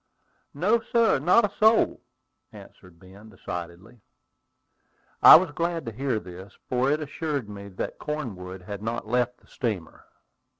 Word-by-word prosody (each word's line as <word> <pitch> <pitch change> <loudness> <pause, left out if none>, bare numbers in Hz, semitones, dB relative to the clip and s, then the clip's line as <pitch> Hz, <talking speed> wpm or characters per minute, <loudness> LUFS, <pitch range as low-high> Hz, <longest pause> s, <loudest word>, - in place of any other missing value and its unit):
"No, 200 +10 +2
sir, 230 - +2
not 180 - +4
a 205 - -6
soul," 220 +1 +3 0.5
answered 90 -2 -15
Ben, 95 +5 -16
decidedly. 90 +5 -9 1.2
I - - +11
was 170 -1 +4
glad 170 +1 -2
to 115 - -5
hear 125 0 -2
this, 95 +1 -12
for 125 +1 +1
it 150 +2 0
assured 145 -4 -4
me 100 -1 -9
that 95 -2 -6
Cornwood 95 -12 -6
had 100 +2 -7
not 115 +1 -4
left 125 +2 -1
the - - -25
steamer. 105 -9 -5
120 Hz, 140 wpm, -25 LUFS, 100-155 Hz, 1.2 s, I